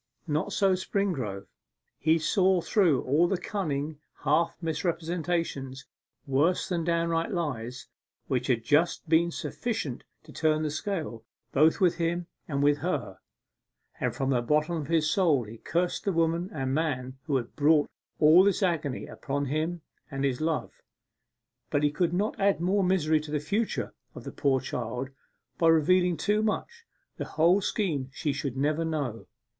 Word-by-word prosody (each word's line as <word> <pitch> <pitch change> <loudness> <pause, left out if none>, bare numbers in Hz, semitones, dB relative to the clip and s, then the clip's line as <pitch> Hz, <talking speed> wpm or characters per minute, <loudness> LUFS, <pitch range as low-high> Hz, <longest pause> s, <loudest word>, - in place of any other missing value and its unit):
Not 155 +5 -1
so 195 -1 +3
Springrove. 175 - -2 0.5
He 160 +2 +3
saw 185 +3 +3
through 170 - +2
all 150 +7 +3
the 195 - 0
cunning 155 -6 -3 0.2
half 155 +4 +2
misrepresentations 165 -5 -2 0.4
worse 145 +7 +2
than 175 -3 -1
downright 165 0 0
lies 130 - -3 0.4
which 125 -1 -1
had 120 -4 +1
just 155 +7 +2
been 165 +2 +4
sufficient 170 - -4 0.2
to 155 - -14
turn 155 -1 +1
the 150 - -1
scale 155 - -4 0.3
both 155 +3 +4
with 180 -3 +3
him 170 +1 -1 0.2
and 140 -2 -1
with 145 0 +3
her; 105 - -3 0.8
and - - -1
from 135 0 0
the 125 -2 +2
bottom 150 +7 +1
of 155 -3 -4
his 160 -1 +2
soul 155 -7 +3
he 110 +1 -10
cursed 175 +1 -1
the 200 - +1
woman 165 +1 +1
and 135 -6 -2
man 130 -4 -2
who 145 - +1
had 120 -3 -2
brought 150 0 +4 0.3
all 160 +4 +7
this 200 +1 +2
agony 155 -7 -1
upon 140 +1 -3
him 155 +5 -2 0.3
and 135 0 -3
his 130 -1 -1
Love. 160 -1 -1 1.0
But 145 -1 +1
he 145 - +3
could 165 +3 0
not 200 +5 -1
add 200 -2 +3
more 190 +3 +2
misery 160 -4 +2
to 150 0 -9
the 150 0 0
future 205 +10 -2 0.2
of - - -8
the - - -6
poor 135 -3 +1
child 125 +2 -4 0.5
by 165 - +4
revealing 175 +2 +4
too 210 +1 +1
much. 460 - -3 0.3
The - - -3
whole 175 +5 +5
scheme 160 - -1
she 145 +1 -2
should 135 -2 -4
never 150 +4 +1
know. 145 -8 -3
160 Hz, 160 wpm, -28 LUFS, 140-175 Hz, 1.0 s, all